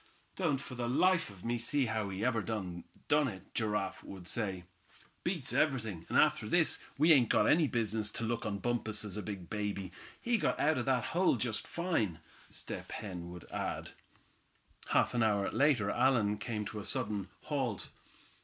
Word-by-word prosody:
"Don't 165 -7 +1
for 135 -1 -9
the 120 -1 -2
life 185 +5 +3
of 95 -1 -12
me 120 0 0
see 135 +4 +1
how 110 -3 -1
he 95 +3 -2
ever 115 -3 +2
done 95 -6 -4 0.3
it," 135 -11 +1
Giraffe 105 -3 -1
would 95 -3 -9
say. 95 -4 -2 0.6
"Beats 170 -7 -2
everything, 110 - 0
and - - +2
after - - +3
this - - +4 0.2
we 160 +4 +7
ain't 125 -6 +5
got 105 - +4
any 155 +5 +5
business 110 -3 +1
to - - -4
look 115 +1 -1
on 105 -3 -2
Bumpus 110 -2 -1
as 100 - -5
a 105 - -3
big 100 -4 -6
baby. 100 -3 -3 0.3
He 235 -1 +1
got - - 0
out 150 -2 +3
of 120 - -2
that 130 -3 +2
hole 180 -3 +4
just 115 -2 -2
fine," 140 - -1 0.3
Step - - -7
Hen 90 -4 -6
would 90 -1 -9
add. - - -3 1.0
Half - - +3
an 120 - +1
hour 105 -3 +2
later, 120 -5 +3
Allan 115 -5 +3
came 105 0 -3
to 105 +1 -5
a - - -6
sudden 105 -7 -1
halt. 135 -8 -2
110 Hz, 180 wpm, -33 LUFS, 100-130 Hz, 1.0 s, we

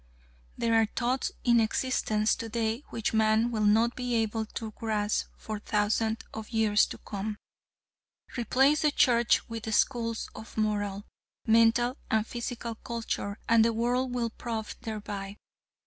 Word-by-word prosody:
There 230 0 +1
are 225 -1 +4
thoughts 250 +2 0
in 235 -1 +5
existence 220 -2 +1
today 225 +2 -2
which 225 -1 -2
man 220 +2 +3
will 215 -2 0
not 225 +3 +3
be 250 -1 -2
able 220 -1 0
to 220 0 -6
grasp 215 -1 -1
for 215 -1 -5
thousands 220 +1 0
of 220 -1 -7
years 220 -2 +3
to - - -8
come. 210 +1 -5 1.0
Replace 265 +5 +3
the 300 - +4
Church 240 -5 +3
with 225 -1 -5
schools 230 -3 0
of 220 - -11
moral, 205 -2 -1 0.4
mental 230 +3 +4
and 220 -1 +2
physical 235 0 -5
culture 225 -3 -4
and 230 -1 +5
the 230 0 +2
world 245 +3 0
will 240 -2 -1
pro& 225 -1 -4 0.2
thereby. 205 -2 -5
225 Hz, 140 wpm, -29 LUFS, 215-235 Hz, 1.0 s, in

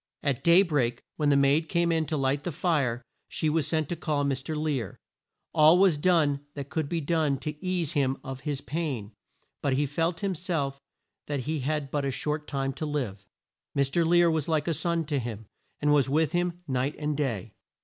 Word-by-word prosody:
At 140 -5 0
day 170 +3 +7
break, 145 -9 0
when 150 -2 +2
the 140 - +4
maid 140 +3 +3
came 170 -1 +2
in 160 -2 +1
to 155 - -1
light 135 +1 +1
the 175 - -3
fire, 145 -7 0 0.2
she 155 - -1
was 155 -2 +1
sent 155 -2 0
to 175 - -1
call 150 -3 -1
Mr. 140 +2 -2
Lear. 145 - -2 0.6
All 160 +2 +7
was 190 -3 +5
done 150 -3 +3 0.2
that 140 0 -6
could 155 -3 -1
be 170 - 0
done 155 -2 +1
to 150 +4 -6
ease 180 -4 0
him 135 -4 +1
of 135 -2 -6
his 140 0 -3
pain, 140 -11 -3 0.5
but 140 - +1
he 145 +3 +2
felt 165 +6 -1
him 195 -1 +1
self 150 -6 -2 0.5
that 145 -2 -2
he 155 +4 -2
had 140 0 -2
but 145 -1 0
a 140 - 0
short 150 +3 -2
time 135 -1 -2
to 155 - -4
live. 110 -10 -3 0.5
Mr. 140 +5 +2
Lear 170 0 +4
was 160 -3 -1
like 155 -1 +1
a 165 - +2
son 170 +1 -1
to 145 -1 -1
him, 115 -3 -5 0.3
and 150 0 +3
was 140 -3 +3
with 155 +1 +2
him 175 0 -1
night 130 +1 -1
and 150 -1 -2
day. 115 -7 -2
150 Hz, 205 wpm, -28 LUFS, 135-165 Hz, 0.6 s, day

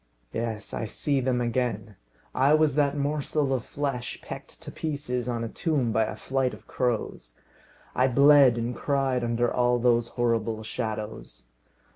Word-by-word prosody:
Yes; 115 -2 -3
I 115 - -2
see 140 +6 0
them 125 -1 0
again. 115 -4 -2 0.4
I 140 +4 +4
was 155 -3 +3
that 145 0 +1
morsel 145 -1 0
of 125 -3 -1
flesh 135 -4 -4
pecked - - -9
to - - -8
pieces 140 -5 -3
on 115 -1 -2
a - - -2
tomb 140 -2 -1
by 110 +1 +2
a 105 - -5
flight 130 +3 -1
of - - -19
crows. 115 - -3 0.6
I 130 - +3
bled 140 -1 +6
and 120 +1 -2
cried 135 -3 0
under 120 0 0
all 125 0 +2
those 120 -1 +2
horrible 115 -2 0
shadows. 110 - -5
125 Hz, 155 wpm, -26 LUFS, 115-140 Hz, 0.6 s, bled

